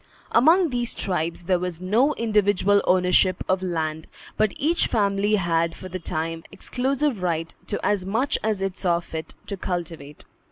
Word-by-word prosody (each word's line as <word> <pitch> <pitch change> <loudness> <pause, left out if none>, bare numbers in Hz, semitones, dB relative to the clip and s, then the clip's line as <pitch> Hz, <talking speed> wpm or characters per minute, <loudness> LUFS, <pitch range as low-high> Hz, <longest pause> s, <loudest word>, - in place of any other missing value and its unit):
Among 325 +7 +5
these 240 -1 -1
tribes 170 -2 -2
there 180 0 +1
was 180 -2 -4
no 230 +11 +2
individual 205 -3 +2
ownership 180 0 +3
of 185 0 +1
land, 160 -3 -3 0.3
but 215 -1 +2
each 325 +4 +1
family 205 -1 +1
had 170 -3 0
for 185 - -9
the 185 +1 -5
time 165 0 -3
exclusive 265 -2 -1
right 165 -2 -1
to 205 - -2
as 205 -3 +1
much 225 +9 0
as 210 -3 -1
it 195 -1 -2
saw 175 -3 +1
fit 160 -2 -7
to 200 - -4
cultivate. 165 -6 -5
185 Hz, 160 wpm, -24 LUFS, 170-215 Hz, 0.3 s, Among